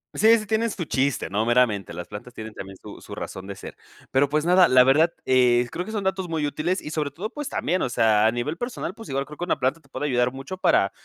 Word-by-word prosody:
Sí, 225 +2 +5
sí 215 - -8
tienes 225 0 0
su 170 - -4
chiste, 135 -1 0
no 105 +3 0
meramente 115 -7 +2
las 90 +1 -7
plantas 105 +4 -9
tienen 110 -1 -8
también 95 0 -9
su - - -10
su - - -11
razón 95 0 -7
de 100 - -6
ser, - - -10 0.3
pero 135 +2 +3
pues 150 +2 0
nada, 180 +1 +5
la 130 0 +6
verdad, 155 +6 +4
eh, 125 -1 +4
creo 180 - -4
que - - -7
son 210 -2 -2
datos 190 -1 -1
muy 160 -3 -1
útiles 165 +6 -1
y - - -7
sobre 150 -2 -2
todo, 190 +9 -5
pues 295 +2 -6
también, 180 +4 -1
o - - -1
sea, 110 -2 +3
a 110 - +4
nivel 130 +8 -3
personal. 240 -5 -4
Pues 225 - -11
igual 135 0 -2
creo 150 - -11
que - - -5
una 175 - 0
planta 135 +5 0
te 140 - -25
puede 145 - -3
ayudar 125 -1 +1
mucho 135 +8 -7
para 100 - +3
140 Hz, 265 wpm, -24 LUFS, 120-180 Hz, 0.3 s, la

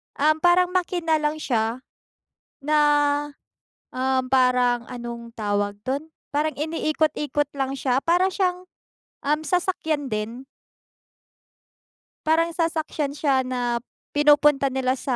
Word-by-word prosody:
Um, 310 +2 +2
parang 355 +1 +4
makina 345 -3 0
lang 300 +1 0
siya, 235 0 -1 0.8
na, 305 +1 +2 1.2
um, 260 0 +1
parang 250 -2 +3
anong 235 -1 -7
tawag 205 -1 -1
do'n? 285 +4 -3 0.2
Parang 305 +2 +1
iniikot-ikot 305 -2 0
lang 270 -1 -1
siya. 260 0 0
Para 355 +3 +3
siyang, 365 -1 -1 0.6
um, 300 +2 +1
sasakyan 320 -5 -1
din. 220 +4 -4 1.9
Parang 330 +1 +3
sasakyan 315 -4 -2
siya 275 -3 +2
na, 245 -2 -1 0.3
pinupunta 295 -1 +4
nila 260 0 -1
sa, 255 -3 -1
290 Hz, 105 wpm, -24 LUFS, 255-315 Hz, 1.9 s, parang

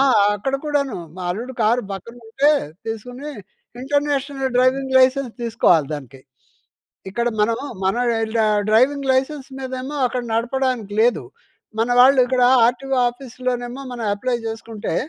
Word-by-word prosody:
ఆ! - - +6 0.3
అక్కడ 270 +7 -2
కూడాను. 280 -4 0 0.2
మా 185 - -6
అల్లుడు 235 +8 -5
కారు, 235 +3 +2
పక్కనుంటే 235 +7 -1 0.4
తీసుకుని. 245 +6 -6 0.5
ఇంటర్నేషనల్ 280 -1 -1
డ్రైవింగ్ 260 +1 +2
లైసెన్స్ 260 -1 +3
తీసుకోవాలి 180 -10 +2
దానికి. 135 -2 -10 0.9
ఇక్కడ 235 +4 -1
మనం 225 +2 +2 0.3
మన 190 +5 +1 0.3
ఈళ్ళ 225 +1 -2
డ - - +4 0.3
డ్రైవింగ్ 265 +5 +3
లైసెన్స్ 270 +1 -1
మీదేమో 260 +2 -5
అక్కడ 250 0 -3
నడపడానికి 245 -3 -1
లేదు. 240 +2 +3 0.6
మన 225 +2 +1
వాళ్ళిక్కడా 255 -1 +5 0.2
ఆర్‌టిఒ 265 +3 -1
ఆఫీస్‌లోనేమో 245 0 -5
మనం 240 -2 -5
అప్లై 240 +4 -1
చేసుకుంటే, 225 -1 -5
250 Hz, 125 wpm, -21 LUFS, 225-270 Hz, 0.9 s, ఆ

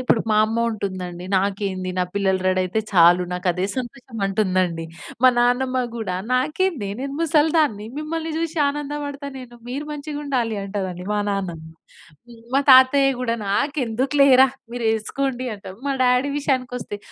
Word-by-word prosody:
ఇప్పుడు 250 -3 +2
మా 215 - +4
అమ్మ 225 +2 -1
ఉంటుందండి, 185 -4 -5
"నాకేంది 190 -1 -1
నా - - +3
పిల్లలు 190 -2 +1
రెడీయితే 185 +3 +1
చాలు 175 -1 +6
నాకు 180 +1 -4
అదే 180 +2 -2
సంతోషం" 255 -1 -7
అంటుందండి. 185 -4 0 0.4
మా 255 - +8
నాన్నమ్మ 255 +2 +2 0.2
గూడా 205 -6 -3 0.2
"నాకేందే 300 - 0
నేను 275 +1 -4
ముసలి 315 -1 +3
దాన్ని 220 -10 +1
మిమ్మల్ని 320 +1 -4
చూసి 330 0 -3
ఆనందపడతాను 285 -1 -4
నేను. 240 -1 -12
మీరు 280 +4 -4
మంచిగా 295 0 -6
ఉండాలి" 240 -6 -1
అంటారండి. 190 -3 -4
మా 210 - +1
నాన్నమ్మ. 180 -5 -3 0.9
మా 275 - +5
తాతయ్య 265 +1 +6
గూడా 235 -2 -1
"నాకెందుకులేరా 265 +3 +3 0.3
మీరు 245 -1 -4
వేసుకోండి" 255 +3 -2
అంటాడు. 195 0 -11
మా 275 - 0
డ్యాడీ 250 +2 +3
ఈ - - -4
విషయానికి 255 -3 -1
వస్తే 205 -3 -7
245 Hz, 145 wpm, -22 LUFS, 195-275 Hz, 0.9 s, మా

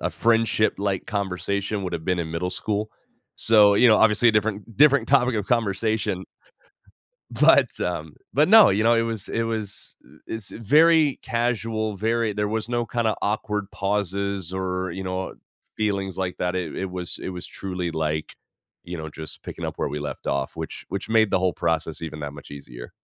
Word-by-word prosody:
a - - 0
friendship-like 110 -4 +1
conversation 100 +1 -2
would 90 -2 -4
have 80 -1 -4
been 90 -1 0
in 80 -1 -4
middle 85 +2 -2
school. 105 +2 -2 0.4
So, 105 -2 +5
you 125 +4 +6
know, 110 - +6
obviously 110 +2 +5
a - - +4
different 105 0 -1
different 140 -4 +5
topic 130 -3 +4
of 105 -2 -2
conversation. 110 -4 0 1.1
But - - +4
um, - - -3 0.2
but, 150 - +4
no, 220 +1 +8
you 105 +3 +1
know, 115 +1 +5
it 115 - +3
was 115 -3 -3
it 115 - -1
was 110 -3 -4 0.3
it's 110 -3 -5
very 150 +5 +4
casual, 115 -3 -1
very 110 +2 0
there 105 0 -1
was 110 +1 -2
no 120 -1 0
kind 120 -1 -1
of 110 - +1
awkward 105 -1 -2
pauses, 100 -2 -2
or, 95 -1 -2
you 95 +3 -5
know, 95 0 -2
uh, - - -11 0.4
feelings 100 -3 -1
like 95 -1 -3
that. 90 0 -1
It 90 -2 -3
it 95 -1 -4
was 90 -1 -4
it - - -4
was 90 -1 -6
truly 90 -2 -4
like, 75 -1 -2 0.5
you 90 0 -6
know, 80 0 -6
just 80 +1 -8
picking - - -6
up - - -5
where - - -1
we 75 - -4
left 75 - -6
off, 70 -1 -1
which - - -7
which 100 +3 -5
made 110 -2 +3
the - - +3
whole 90 -1 +1
process 80 -1 -1
even 75 -2 -6
that 75 -1 -5
much 75 0 -12
easier. - - -10
100 Hz, 190 wpm, -24 LUFS, 90-110 Hz, 1.1 s, no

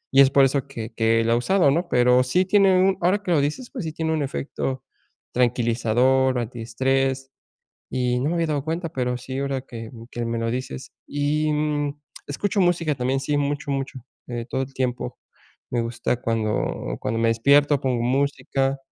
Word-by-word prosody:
y 135 - +9
es 135 - +7
por 140 0 +5
eso 135 0 0
que 115 -5 -7
que 115 0 +2
la 115 - +2
he - - +4
usado, 170 +4 +3
¿no?, 170 +4 0
pero 125 -1 +4
sí 175 +9 +2
tiene 195 -1 +4
un 190 0 +3
ahora 190 +4 +2
que 180 - -2
lo 150 -4 +4
dices, 150 - -3
pues, 245 - -5
sí 160 -1 -4
tiene 160 0 -1
un 155 - 0
efecto 135 -1 -3 0.5
tranquilizador, 125 +2 +2
antiestrés 130 +3 -1 0.6
y 125 -1 0
no 140 +5 0
me - - 0
había 165 - +1
dado 145 -3 -1
cuenta, 165 +2 -2
pero 125 -4 -2
sí 130 +1 -6
ahora 135 -1 -1
que 115 -3 -9 0.2
que 120 0 -4
me 115 0 -2
lo 115 0 -1
dices, 120 - -5 0.2
y, 150 +2 0
mm, 145 -1 -1 0.3
escucho 195 +7 0
música 170 -3 +2
también, 130 +1 -1
sí, 145 +2 -1
mucho, 145 0 -1
mucho, 135 -1 -3 0.3
eh, 120 -2 -5
todo 130 - -1
el 135 - -7
tiempo 125 -2 -3 0.5
me 120 -1 0
gusta 120 +1 -1
cuando 110 -2 -1
cuando 115 +1 -2
me 115 - +3
despierto 140 +6 +4
pongo 130 -3 -1
música, 135 +1 0
135 Hz, 185 wpm, -23 LUFS, 125-150 Hz, 0.6 s, y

